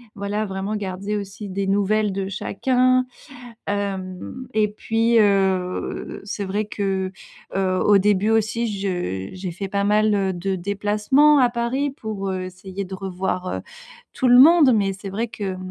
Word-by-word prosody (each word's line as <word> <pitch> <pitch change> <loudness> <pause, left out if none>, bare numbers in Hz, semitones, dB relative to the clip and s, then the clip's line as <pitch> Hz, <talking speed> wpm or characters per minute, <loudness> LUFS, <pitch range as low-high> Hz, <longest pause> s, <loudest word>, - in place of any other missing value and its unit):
voilà. 205 +2 -2
Vraiment 195 +2 -3
garder 200 +1 -3
aussi 200 +1 -7
des 195 +1 -2
nouvelles 205 +1 +1
de 195 0 -2
chacun, 255 +6 +1 0.6
hem, 200 +4 -4
et 215 -1 +3
puis, 225 +2 +1
heu, 190 -3 0
c'est 200 0 -4
vrai 205 +3 -1
que, 195 -2 -2 0.4
heu, 185 -1 +1
au 205 -1 +6
début 205 +1 +2
aussi, 225 +1 +1
je 175 - -3
j'ai 185 -1 -5
fait 195 +3 -5
pas 200 +1 0
mal, 210 +1 +3
heu, 195 -1 0
de 190 +2 -2
déplacements 210 +10 +3
à 250 -2 +5
Paris 240 +4 -1
pour, 215 -7 -5
heu, 185 -1 -2
essayer 190 +1 -7
de 190 +1 -6
revoir, 185 -1 -3
heu, - - -3 0.5
tout 255 - 0
le 245 0 +7
monde. 300 -2 +7
Mais 195 -2 +1
c'est 195 0 -8
vrai 225 +5 -2
que, 195 -3 -4
200 Hz, 160 wpm, -22 LUFS, 190-215 Hz, 0.6 s, le